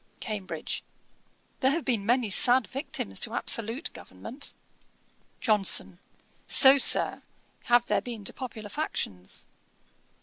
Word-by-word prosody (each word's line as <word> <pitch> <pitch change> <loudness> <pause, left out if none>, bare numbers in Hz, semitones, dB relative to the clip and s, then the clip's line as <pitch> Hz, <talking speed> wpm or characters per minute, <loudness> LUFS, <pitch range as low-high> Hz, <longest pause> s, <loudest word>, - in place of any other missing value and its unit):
CAMBRIDGE. 210 -4 -6 0.8
'There 265 - +2
have 315 +3 -3
been 235 -6 -1
many 235 0 0
sad 245 +4 +5
victims 275 +3 -4
to - - -4
absolute 230 +7 +1
government.' 265 +5 -7 0.9
JOHNSON. 195 -4 +1 0.5
'So, 275 0 +7
Sir, - - +4 0.4
have 240 -1 +2
there - - -1
been 230 -5 -9
to - - -5
popular 225 -6 -9
factions.' 95 - -6
240 Hz, 110 wpm, -26 LUFS, 210-265 Hz, 0.9 s, So